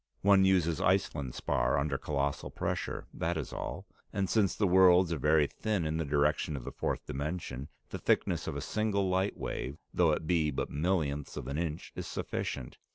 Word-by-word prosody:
One 100 -1 +6
uses 90 -4 +2
Iceland 80 -9 +1
spar - - +1
under 70 0 0
colossal 70 0 -2
pressures, - - -3
that 85 0 -1
is 75 - -4
all. - - -5 0.3
And 100 -1 0
since 100 -1 +2
the 105 - +1
worlds 90 -2 +6
are 80 - -3
very 75 +2 +4
thin 100 +2 -2
in 80 +1 -1
the 80 - -1
direction 75 +1 +1
of 65 - -7
the - - -5
fourth - - -2
dimension, 70 -2 -4 0.2
the - - -5
thickness - - +1
of - - -3
a 70 - -3
single 100 +4 0
light 95 +2 +1
wave, 70 +4 -4 0.2
though 85 -2 +4
it 75 - -1
be 80 -2 +2
but 65 - -3
millionths 75 -3 -1
of - - -4
an 70 +3 -2
inch, 80 -2 -3
is - - -5
sufficient. 65 - -4
80 Hz, 190 wpm, -31 LUFS, 70-95 Hz, 0.3 s, One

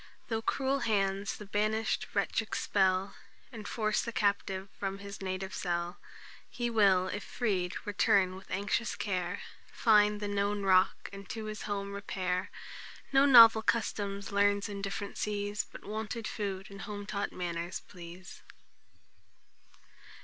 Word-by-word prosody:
Though 225 -1 -1
cruel 270 +3 0
hands 200 -4 0
the 210 - -9
banish'd 215 +2 0
wretch 200 +2 +1
expel, 190 -3 +1 0.4
And 215 -4 -8
force 215 -2 0
the 235 - -4
captive 200 -3 0
from 195 -1 -2
his 200 +1 -9
native 190 0 -3
cell, 175 0 -2 0.5
He 240 -1 -2
will, 195 -4 +4
if 205 +2 -4
freed, 190 -7 -1
return 195 -2 +3
with 190 - -12
anxious 205 +4 -1
care, 180 -2 -2 0.3
Find 210 -2 +4
the 205 - -3
known 205 0 0
rock, 185 -1 +3
and 200 +3 -10
to 225 -4 -5
his 215 -1 -5
home 200 -1 -3
repair; 185 -2 -2 0.6
No 270 +1 +6
novel 230 -4 +9
customs 200 -3 -1
learns 200 0 +2
in 200 -1 -6
different 200 0 -4
seas, 205 -2 -2
But - - -11
wonted 220 +2 -4
food 195 -2 -4
and 200 0 -9
home 205 -1 -6
taught 200 0 -2
manners 175 0 -4
please." 175 0 -11
200 Hz, 140 wpm, -31 LUFS, 190-215 Hz, 0.6 s, novel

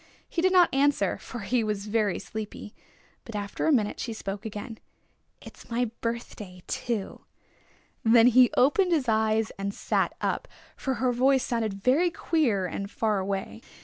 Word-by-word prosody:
He 335 - -2
did 370 +1 +3
not 360 -5 +5
answer, 280 +1 +2
for 245 - -8
he 240 +3 0
was 210 -2 -2
very 210 -2 0
sleepy. 215 -1 -7 0.5
But 230 - -9
after 205 +6 -3
a - - +4
minute 220 -7 +1
she 230 - -3
spoke 200 -1 -5
again. 220 +2 -7 0.6
"It's - - -13
my 235 -1 -1
birthday 215 -6 -5
too!" 225 -5 -3 0.8
Then 230 0 +6
he 250 0 +6
opened 345 +8 +4
his 290 -6 +1
eyes 220 0 +1
and 200 0 -3
sat - - 0
up, - - -2 0.3
for 265 -1 -2
her 250 0 +1
voice 265 +2 +3
sounded 225 -4 -1
very 305 +8 +4
queer 280 - 0
and 195 +3 -4
far 215 -2 0
away. 190 - -4
225 Hz, 160 wpm, -27 LUFS, 205-255 Hz, 0.8 s, Then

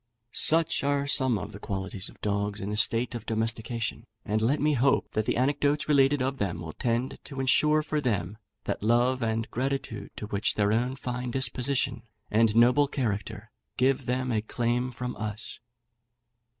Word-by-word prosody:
Such 165 -2 +5
are 140 0 +1
some 130 -5 +3
of 105 +2 -6
the 100 - -10
qualities 95 -1 -3
of - - -17
dogs 100 0 -1
in 100 0 -4
a - - -2
state 115 +2 +2
of 115 -2 -7
domestication, 115 +1 -2 0.2
and 110 +1 0
let 130 +7 +2
me 150 +1 +2
hope 135 +1 +2
that 110 0 -1
the - - +1
anecdotes 145 +3 +1
related 140 -2 +3
of 135 +1 -2
them 90 -4 -2
will 80 -2 -7
tend 120 +2 -2
to 135 -2 -8
insure 150 +4 +3
for 150 0 -2
them 105 -5 -2 0.2
that - - -3
love 120 +4 +2
and 115 0 -1
gratitude 130 -3 -3
to - - -6
which 105 -1 -1
their 105 0 +2
own 125 +3 0
fine 125 -2 -4
disposition 125 0 0 0.3
and 110 0 +3
noble 125 +5 +5
character 110 -3 -3 0.3
give 130 0 +1
them 125 +1 -1
a 110 -2 +1
claim 120 +3 -1
from 125 0 -5
us. 110 0 -3
120 Hz, 175 wpm, -27 LUFS, 110-135 Hz, 0.3 s, Such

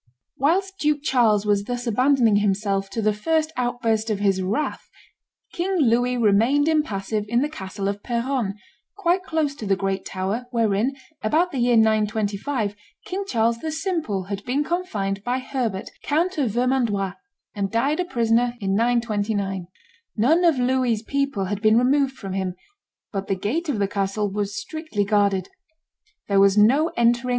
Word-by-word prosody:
Whilst 385 +7 0
Duke 295 -1 +1
Charles 225 -7 +3
was 205 -1 +1
thus 245 +1 -4
abandoning 240 -2 +3
himself 195 -1 0
to 225 +2 -3
the 215 0 +3
first 315 +8 0
outburst 230 -3 0
of 215 - 0
his 195 -2 +1
wrath, 210 +11 -2 0.6
King 375 +3 -1
Louis 245 -3 +2
remained 235 +7 +3
impassive 215 -10 0
in 235 +3 +1
the - - 0
castle 195 -8 -5
of 200 0 -3
Peronne, 235 -3 -1 0.4
quite 365 -1 +2
close 320 -5 -1
to 225 -7 -7
the 195 - +3
great 195 0 -2
tower, 195 +6 -3
wherein, 230 +2 +1 0.3
about 325 +11 +1
the 270 - -3
year 240 0 +3
925, 215 +1 +1 0.3
King 390 +2 -3
Charles 230 - +1
the 315 +3 -4
Simple 320 - -2
had 200 +1 -5
been 275 +4 0
confined 210 - -2
by 245 +2 0
Herbert, 250 -7 -3
Count 340 +5 0
of 265 -5 +1
Vermandois, 230 -5 0 0.4
and 200 -3 -2
died 270 - 0
a 360 - +1
prisoner 240 -3 +1
in 195 -2 -1
929. 210 -4 0 0.5
None 305 +11 +3
of 330 -5 +4
Louis's 250 -3 +1
people 275 -6 -1
had 200 +2 -3
been 215 0 +5
removed 265 +2 +2
from 195 -2 -6
him; 190 -2 -2 0.6
but 195 -1 -3
the 195 - 0
gate 295 - -2
of 265 - 0
the 200 -1 +1
castle 200 +1 -1
was 205 +1 -2
strictly 315 -5 -3
guarded. 200 -2 +1 0.8
There 200 -1 +3
was 195 +1 +5
no 260 +10 +5
entering. 235 +1 +2
230 Hz, 160 wpm, -23 LUFS, 205-275 Hz, 0.8 s, been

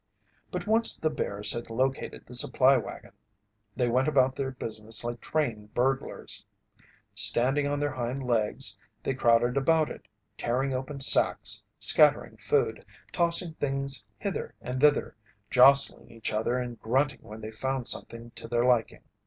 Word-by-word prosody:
But - - -4
once 225 +2 +2
the 155 - 0
bears 105 -8 -1
had 120 0 -6
located 130 +4 -2
the 125 - -13
supply 130 +2 +4
wagon, 125 - -5 0.6
they 125 -2 +1
went 130 +4 +2
about 130 -3 +3
their 135 -1 -2
business 110 -3 -4
like 120 0 -5
trained 115 -9 -3
burglars. 135 +2 -1 0.7
Standing 135 +4 +1
on 145 0 -1
their 145 0 -1
hind 130 +1 -3
legs, 115 -4 0 0.2
they 135 - -1
crowded 120 0 +3
about 155 +3 +2
it, - - -11 0.3
tearing 130 +3 0
open 135 +2 -4
sacks, - - +1 0.2
scattering - - +4
food, - - 0 0.3
tossing 170 0 +2
things 135 -5 -3
hither 200 -2 -4
and 130 +1 -4
thither, 150 -1 +3 0.4
jostling 135 +2 +5
each 115 -1 -5
other 115 +3 0
and 120 -2 -5
grunting 135 +3 0
when 110 +1 -10
they 110 0 -7
found 130 +2 -3
something 115 0 0
to - - -8
their 120 +1 +1
liking. 125 -3 +1
130 Hz, 150 wpm, -28 LUFS, 120-140 Hz, 0.7 s, jostling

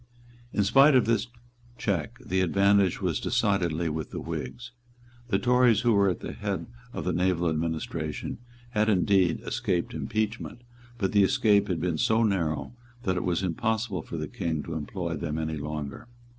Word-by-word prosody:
In 105 - +1
spite 135 +8 +6
of 125 - +5
this 115 0 +1 0.5
check 95 -8 -2
the 95 +1 +1
advantage 100 +1 +3
was - - 0
decidedly 85 -4 +1
with 80 0 -3
the - - -5
Whigs; 120 -1 -6 0.6
The 105 -5 +2
Tories 120 0 +4
who 120 -2 +3
were 100 -1 +4
at 90 - -3
the - - -5
head - - -3 0.3
of - - -5
the - - 0
naval 90 -1 +1
administration 80 +1 -3 0.3
had 110 -2 +2
indeed 95 -3 +3
escaped 100 -8 -1
impeachment; 110 +2 -3 0.3
but 95 -4 0
the 100 - +4
escape 105 -2 +4
had 90 -3 -1
been 85 -2 -1
so 110 +1 +3
narrow 90 -4 0 0.3
that 95 -4 0
it 90 - -1
was 90 +1 0
impossible 110 +1 -1
for 85 - -7
the 75 -1 -3
King 80 0 -3
to 85 - -6
employ 85 +2 -3
them 80 -1 -3
any 80 -1 -2
longer. 75 - -5
95 Hz, 170 wpm, -27 LUFS, 80-110 Hz, 0.6 s, spite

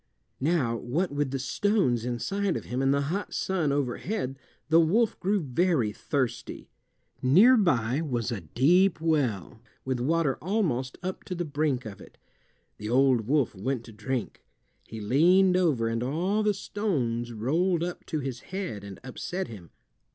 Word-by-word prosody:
Now 135 -6 +1
what 155 +10 -1
with 145 -1 -1
the 135 - -2
stones 130 - +1
inside 195 +11 -1
of - - -8
him 125 +2 -2
and 135 0 +3
the 140 0 +2
hot 200 +1 -4
sun 175 -7 0
overhead 140 - -2 0.3
the 160 +2 +5
wolf 205 +8 +2
grew 200 +2 +1
very 145 - +1
thirsty. 130 +3 -3 0.5
Near 190 - +6
by 135 - +2
was 125 -6 -2
a 115 - -3
deep 160 - +3
well, 125 - -1 0.2
with 130 -1 -1
water 150 +1 +1
almost 155 - -1
up 185 +1 -4
to 180 - -4
the 175 0 -2
brink 145 -4 -1
of 100 -3 -8
it. - - -15 0.6
The 105 - -5
old 125 -3 +3
wolf 140 -1 +2
went 115 +5 -3
to 115 - -12
drink. 115 +3 -4 0.4
He 110 - -7
leaned 175 - +4
over, 155 -11 +2
and 115 0 -1
all 175 - 0
the 210 -1 +2
stones 125 - -2
rolled 165 - 0
up 175 0 -5
to 155 -3 -2
his 130 -3 -4
head 185 - -5
and 100 -1 -9
upset 175 +8 -4
him. 95 -8 -10
140 Hz, 160 wpm, -27 LUFS, 120-180 Hz, 0.6 s, Near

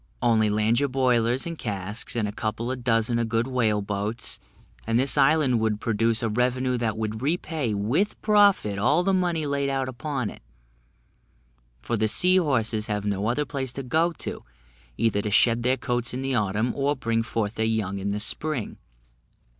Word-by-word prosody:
Only 110 -3 +3
land 110 +3 +2
your 140 0 0
boilers 125 -1 +1
and 170 -1 -6
casks, 105 +1 -3
and 110 -3 0
a - - -4
couple 110 +3 -3
of 125 -2 -5
dozen 115 0 +2
of 115 -1 -1
good 115 +1 +1
whale 115 -5 0
boats, 105 +3 -3 0.5
and 115 0 +2
this 135 +1 +3
island 140 -3 +3
would 110 -1 0
produce 115 +1 0
a - - +1
revenue 125 +3 0
that 110 -2 -1
would 110 0 -3
repay 150 -5 -1
with 120 - 0
profit 200 - +3
all 145 - +3
the 195 +1 +1
money 175 -4 0
laid 140 -1 -1
out 135 -1 -1
upon 130 -2 -3
it, - - -14 1.4
for 120 - -1
the 110 +1 +2
sea 180 - +4
horses 115 -10 0
have 105 -1 -2
no 100 0 -1
other 125 +6 0
place 130 -3 -4
to 135 - -5
go 160 +7 +1
to, - - -6 0.5
either 110 -3 +1
to 105 - -3
shed 115 +3 +3
their 130 +2 +1
coats 120 -2 -2
in 130 - -3
the 135 0 -1
autumn, 105 +1 0
or 140 +1 0
bring 115 -3 0
forth 115 -2 -2
their 110 - -2
young 110 -3 -1
in 100 +1 -3
the 100 +1 -2
spring. 135 +3 -3
120 Hz, 185 wpm, -25 LUFS, 110-135 Hz, 1.4 s, sea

